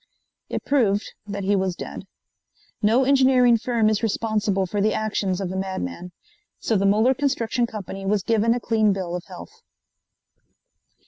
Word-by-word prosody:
It - - -4
proved 215 -8 +1
that 200 -1 -4
he 200 +2 +2
was 190 -2 -1
dead. - - -8 0.7
No 225 +5 +3
engineering 260 -3 +4
firm 230 -1 +1
is 215 -1 +1
responsible 210 -3 0
for 200 +3 -2
the 215 +1 +1
actions 200 -3 -1
of 190 -2 -3
a - - -5
madman. 180 - -4 0.5
So 225 - -1
the 195 0 +2
Muller 220 +6 +4
Construction 255 -3 0
Company 195 -3 -7
was 205 -1 +1
given 230 +2 +2
a - - -2
clean 220 -3 +2
bill 180 -2 -4
of 180 - -6
health. 85 0 -12
210 Hz, 155 wpm, -23 LUFS, 195-230 Hz, 0.7 s, engineering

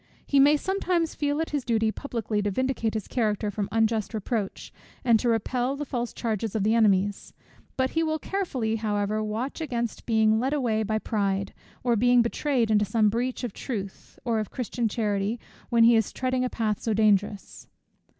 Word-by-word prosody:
He 280 - +3
may 290 +2 +6
sometimes 360 -2 0
feel 290 0 -1
it 325 - -3
his 290 -3 -1
duty 225 -2 +1
publicly 225 -5 -3
to 205 - 0
vindicate 230 0 -1
his 215 - -3
character 210 -3 0
from 205 0 -3
unjust 225 0 +1
reproach, 215 -1 -3 0.3
and 230 -3 +5
to 240 - 0
repel 245 +4 0
the 295 +1 -4
false 240 -3 -3
charges 220 -2 -3
of 205 -2 0
his 220 - +3
enemies; 205 -3 +2 0.4
but 260 0 +1
he 325 - +1
will 315 -1 0
carefully 270 - -2
however 210 0 -1
watch 225 +8 -3
against 235 -7 -3
being 220 -1 +3
led 265 +4 0
away 235 -7 +1
by 215 0 0
pride, 200 -3 -1 0.3
or 240 -2 +2
being 245 +2 +4
betrayed 235 -1 0
into 210 -1 +4
some 210 +1 +2
breach 245 +4 -2
of 240 -5 -3
truth 200 -7 -6
or 230 -2 +1
of 215 - -3
Christian 240 -1 -2
charity, 210 0 -1 0.3
when 235 -1 +4
he 235 +1 +7
is 225 -2 +1
treading 255 0 -1
in 255 - +1
a - - -6
path 215 -4 -1
so 220 -2 0
dangerous. 205 -1 +1
225 Hz, 190 wpm, -26 LUFS, 215-255 Hz, 0.4 s, he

